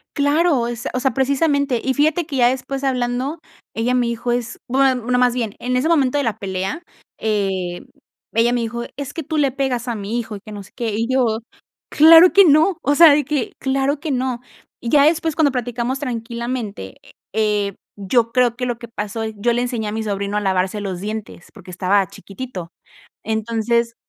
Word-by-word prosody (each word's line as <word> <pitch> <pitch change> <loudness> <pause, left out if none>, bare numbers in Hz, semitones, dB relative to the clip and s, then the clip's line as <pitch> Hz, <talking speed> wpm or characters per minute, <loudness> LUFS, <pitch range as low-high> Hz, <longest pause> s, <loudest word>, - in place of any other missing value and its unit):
Claro, 285 -3 +2
es 240 0 -5
o 255 - -1
sea, 265 +1 +1
precisamente, 280 0 +1
y 265 - +1
fíjate 310 +4 +1
que, 280 -3 -4
ya 240 - +5
después 270 +1 -4
hablando, 255 +3 -1 0.4
ella 235 +3 0
me 245 -1 +2
dijo 235 +1 -2
es 240 -1 -3
bueno 260 -2 +2
no 250 - +3
más 250 -1 +3
bien, 225 -4 -2
en 250 +1 -2
ese 260 +5 +1
momento 290 -4 +2
de 285 - +1
la 220 -2 -1
pelea, 190 - -3 0.4
eh, 195 -5 -1 0.5
ella 230 +2 +3
me 245 - 0
dijo: 235 +1 -3
"Es 280 -2 -5
que 325 - -5
tú 310 +3 -3
le 280 -2 +2
pegas 255 -2 -2
a 235 - -2
mi 210 +3 -4
hijo, 225 -2 -6
y - - -8
que 215 - -12
no 205 -1 -7
sé 195 - -18
qué", 235 -3 -2
y 225 +2 -1
yo: 235 -4 +1 0.5
"Claro 330 +3 +8
que 395 -1 +7
no", 315 +3 +4
o 290 - +1
sea, 330 -1 +9
de 295 0 +2
que: 285 -3 -2
"Claro 275 +2 0
que 315 -2 -4
no", 255 -1 -1 0.4
y 235 - -4
ya 285 +2 +5
después 320 -1 +1
cuando 305 -3 +3
platicamos 245 +1 -2
tranquilamente, 235 - -5 0.4
eh, 210 -2 0 0.2
yo 225 +4 +1
creo 245 -2 +2
que 250 - -3
lo 240 -2 -2
que 235 - -9
pasó 220 0 -5
yo 220 +2 -1
le 240 - 0
enseñé 240 -3 -2
a - - -3
mi 220 +1 -3
sobrino 200 0 -2
a - - 0
lavarse 190 +1 0
los 190 -3 -4
dientes 210 -3 -6
porque 190 -4 -12
estaba 190 +2 +1
chiquitito, 190 -2 -8 0.5
entonces, 230 +1 -1
240 Hz, 200 wpm, -20 LUFS, 215-270 Hz, 0.5 s, sea